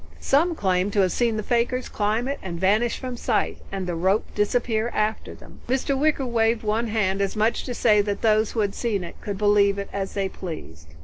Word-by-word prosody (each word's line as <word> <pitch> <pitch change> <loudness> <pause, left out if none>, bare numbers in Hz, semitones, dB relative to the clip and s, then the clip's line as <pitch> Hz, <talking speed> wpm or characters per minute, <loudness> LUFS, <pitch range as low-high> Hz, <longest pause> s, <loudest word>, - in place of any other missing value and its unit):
Some 330 +5 +2
claim 185 -4 +1
to 205 0 +2
have 185 -2 +2
seen 235 -3 +1
the 215 - -2
fakirs 245 +3 0
climb 215 +4 -1
up 280 - 0
it - - -10
and 170 -3 -5
vanish 210 +6 +2
from 255 -2 -5
sight, - - -1
and 195 -1 -3
the 175 - -2
rope 190 +5 +1
disappear 225 +1 0
after 215 +1 -1
them." - - -16
Mr. 265 +2 0
Wicker 285 -1 +1
waved 230 -1 +1
one 220 +2 0
hand 200 -3 0
as 195 - -1
much 220 +2 +1
as - - -5
to 250 - -3
say 210 -3 +4
that 205 +1 -3
those 215 -1 +3
who 225 - 0
had 200 -1 0
seen 210 -6 -1
it 170 - -10
could 205 -2 -4
believe 205 -1 +3
as 200 -1 -4
they 195 -1 0
pleased. 80 - -8
215 Hz, 225 wpm, -24 LUFS, 195-235 Hz, -, say